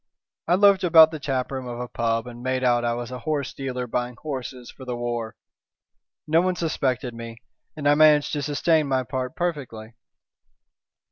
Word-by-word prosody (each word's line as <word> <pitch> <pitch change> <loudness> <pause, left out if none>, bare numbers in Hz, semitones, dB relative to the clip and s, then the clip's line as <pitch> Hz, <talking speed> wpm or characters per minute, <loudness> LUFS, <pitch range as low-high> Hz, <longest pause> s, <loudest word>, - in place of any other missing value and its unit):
"I 175 - +4
loafed 200 0 +5
about 160 -2 +7
the 155 - -6
taproom 130 -2 -3
of 120 -1 -6
a 125 - -4
pub, 115 -1 -1
and 120 -1 -10
made 130 0 -1
out 120 -1 +3
I 120 0 0
was 120 0 -6
a 125 - -6
horse 145 +1 -2
dealer 125 -2 -4
buying 125 +1 -3
horses 130 -4 -6
for 130 - -13
the 125 -2 -4
war. 120 -2 -4 0.9
No 160 +2 +3
one 185 0 0
suspected 130 -7 -1
me, 115 0 -8 0.4
and 150 -2 -2
I 145 - +6
managed 150 -1 +5
to 145 - -1
sustain 150 +2 +1
my 130 -1 +1
part 130 +2 -4
perfectly." 130 -10 -4
130 Hz, 180 wpm, -24 LUFS, 120-150 Hz, 0.9 s, about